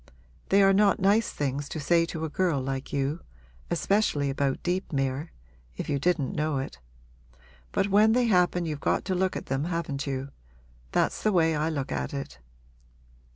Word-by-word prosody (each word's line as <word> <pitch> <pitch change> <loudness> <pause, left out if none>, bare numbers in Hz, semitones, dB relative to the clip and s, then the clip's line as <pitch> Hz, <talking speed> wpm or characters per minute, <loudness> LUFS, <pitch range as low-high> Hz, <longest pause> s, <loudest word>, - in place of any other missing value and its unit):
They 200 +1 +5
are 195 0 +5
not 200 0 +4
nice 205 +3 +3
things 140 0 -3
to 160 - -4
say 165 +3 +2
to 160 -2 -4
a - - -4
girl 170 -2 +1
like 135 0 -4
you 140 +4 -1 0.5
especially 150 -9 +1
about 135 -1 -1
Deepmere, 145 -5 -1 0.5
if - - -5
you 140 -1 0
didn't 155 -3 0
know 150 -1 0
it. 135 - -5 0.9
But 195 - 0
when 215 +2 +5
they 250 0 +3
happen 180 -4 +2
you've 150 -3 -3
got - - 0
to 190 - -1
look 185 +1 0
at - - -5
them, 135 +3 -1
haven't 165 -5 -3
you? 135 0 -3 0.6
That's - - +1
the 215 - +2
way 165 -4 +3
I 155 +2 0
look 145 -4 -3
at - - -3
it.' 70 - -6
155 Hz, 175 wpm, -27 LUFS, 140-185 Hz, 0.9 s, They